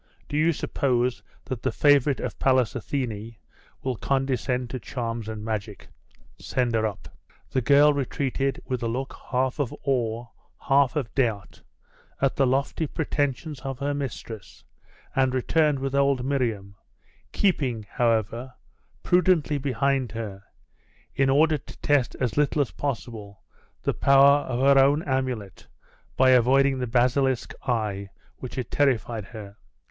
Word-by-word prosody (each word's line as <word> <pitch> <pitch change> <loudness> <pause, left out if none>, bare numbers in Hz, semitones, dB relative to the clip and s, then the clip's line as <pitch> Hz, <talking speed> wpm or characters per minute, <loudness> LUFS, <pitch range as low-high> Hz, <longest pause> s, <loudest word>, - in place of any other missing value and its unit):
Do - - -5
you 155 +3 +3
suppose 125 -5 0 0.2
that 125 -3 -5
the - - 0
favourite 145 -1 +3
of 125 - -5
Pallas 130 -3 +3
Athene 115 -3 -4 0.5
will 130 -1 -1
condescend 130 -2 -1
to 130 - -4
charms 115 -3 -4
and 110 -1 -6
magic? 105 -2 -5 0.5
Send 125 -2 -1
her 110 -1 +2
up.' 105 - -9 0.4
The 130 - +1
girl 145 +5 +5
retreated, 135 -1 -1
with 130 -2 -3
a 115 - -1
look 130 +4 -3
half 130 +2 0
of 140 -5 -1
awe, 120 -4 -1 0.3
half 140 +1 +2
of 130 -6 -3
doubt, 115 -7 -1 0.6
at 135 -1 +1
the 135 - +3
lofty 140 +4 0
pretensions 145 -1 -2
of 135 -1 -5
her 140 +2 -1
mistress, 120 -6 -7 0.5
and 130 -1 +2
returned 150 +3 +2
with 135 0 -3
old 140 -2 +2
Miriam, 110 -8 -2 0.5
keeping, 130 - 0
however, 115 +2 0 0.5
prudently 175 -5 +2
behind 135 -2 0
her, 105 -4 -6 0.7
in 135 0 +2
order 150 +2 +3
to - - -13
test 145 -4 +2
as 125 -3 -1
little 150 0 +3
as 130 - -10
possible 115 -7 -5 0.4
the - - +1
power 140 +1 +6
of 125 -1 -2
her 135 0 +6
own 145 +4 +2
amulet 130 -8 -3 0.5
by 130 0 +5
avoiding 135 +2 +4
the 125 - -2
basilisk 130 +2 +1
eye 105 -5 -1 0.3
which 130 - -8
had 130 - -4
terrified 120 -6 +1
her. 100 -1 -10
130 Hz, 140 wpm, -25 LUFS, 115-140 Hz, 0.7 s, power